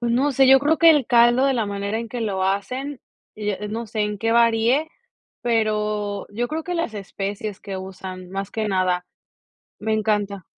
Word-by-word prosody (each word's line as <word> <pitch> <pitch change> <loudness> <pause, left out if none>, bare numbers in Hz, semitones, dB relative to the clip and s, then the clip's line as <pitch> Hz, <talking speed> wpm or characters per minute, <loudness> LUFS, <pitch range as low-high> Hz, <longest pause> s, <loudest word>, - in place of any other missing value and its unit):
Pues 235 -1 0
no 275 +4 +2
sé, 270 +1 +4
yo 270 0 +8
creo 300 +3 +1
que 330 -1 +8
el 290 -6 +3
caldo 240 +1 +5
de 270 - +2
la 225 -4 0
manera 200 +2 -3
en 230 -1 -5
que 245 +1 -5
lo 195 -4 -1
hacen, 250 +8 -2 0.3
y, 210 -1 -2
eh, 210 +1 -4
no 225 +2 -4
sé 220 0 -4
en 210 0 -1
qué 225 +2 0
varíe, 235 +6 +3 0.5
pero 210 -3 0
yo 240 +4 -2
creo 315 +1 -4
que 360 - -3
las 335 -10 -2
especies 200 +1 -5
que 195 -1 -6
usan, 185 -1 -8
más 195 +1 -4
que 215 0 -2
nada, 185 -2 0 0.7
me 220 - -1
encanta. 210 -3 0
215 Hz, 200 wpm, -22 LUFS, 200-240 Hz, 0.7 s, yo